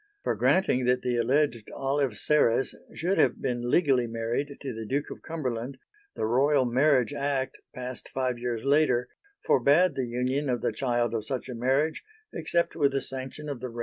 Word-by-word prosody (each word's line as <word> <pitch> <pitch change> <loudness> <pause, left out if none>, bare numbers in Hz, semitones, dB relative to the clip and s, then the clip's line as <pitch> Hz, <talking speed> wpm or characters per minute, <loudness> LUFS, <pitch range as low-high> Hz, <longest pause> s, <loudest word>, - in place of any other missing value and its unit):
For - - +1
granting 185 -10 +2
that 125 0 +2
the 125 -1 0
alleged 120 -1 +1
Olive 135 -4 0
Serres 135 -1 +2 0.2
should 180 +4 0
have - - +3
been 120 -1 -2
legally 135 -6 +3
married 115 +5 -3
to 135 -3 -5
the 110 0 -6
Duke 140 +6 -2
of - - -8
Cumberland, 130 -5 -4 0.4
the - - -1
Royal 135 +4 +3
Marriage 130 +1 +3
Act, 140 -2 -2 0.2
passed 125 -1 -6
five 130 -2 -2
years 120 -2 -3
later, 140 -3 +2 0.4
forbade 145 +7 +4
the 130 -2 -2
union 130 +4 -1
of 120 -2 0
the - - 0
child 120 -3 0
of 110 -2 -3
such 130 -2 -3
a - - -4
marriage, 135 +6 0 0.3
except 170 0 0
with 140 -4 +2
the 135 - +1
sanction 135 +3 -7
of 140 -4 -4
the 130 - -4
reigning 115 - -11
monarch. - - -6
130 Hz, 185 wpm, -27 LUFS, 120-145 Hz, 0.4 s, forbade